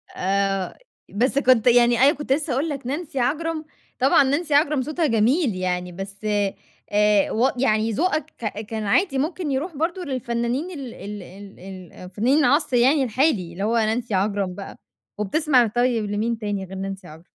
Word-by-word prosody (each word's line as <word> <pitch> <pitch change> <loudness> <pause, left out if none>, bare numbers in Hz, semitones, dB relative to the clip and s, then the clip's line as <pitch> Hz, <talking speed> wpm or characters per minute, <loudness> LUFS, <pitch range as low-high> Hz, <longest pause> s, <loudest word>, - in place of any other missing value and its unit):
آآ، 195 0 -1 0.3
بس 255 +6 +1
كنت 255 -3 +3
يعني، 240 -1 +5
أنا 275 +3 +6
كنت 280 -2 -1
لسه 295 +1 -2
هاقول 285 +6 -1
لك، 275 -4 -5
نانسي 290 -1 -4
عجرم، 310 +5 -1 0.3
طبعًا 270 +2 +5
نانسي 290 +3 -1
عجرم 290 -1 +3
صوتها 310 +4 -1
جميل 230 - +2
يعني، 180 -1 -2
بس، 195 +3 -8
آآ، 205 0 0
و 245 +5 +2
يعني 220 -3 +1
ذوقك 310 - 0
ك 215 -1 -5
كان 220 0 -5
عادي 275 - +1
ممكن 310 +1 -2
يرُوح 305 +6 -3
برضه 340 +5 -2
للفنانين 250 +4 -2
ال 250 -4 -7
ال 205 -1 -8
ال 195 +2 -13
ال 185 -1 -11
فنانين 235 +9 +1
العصر 290 -1 +2
يعني 270 +4 +4
الحالي، 235 - +1
اللي 190 +3 -5
هو 230 +3 +1
نانسي 225 +1 0
عجرم 195 -1 0
بقى. 200 - -8 0.4
وبتسمع 250 +3 +2
طيب 240 -1 0
لمين 220 +3 -1
تاني 205 -3 -3
غير 190 - -10
نانسي 195 -1 -6
عجرم؟ 160 +2 -13
235 Hz, 170 wpm, -23 LUFS, 200-280 Hz, 0.4 s, أنا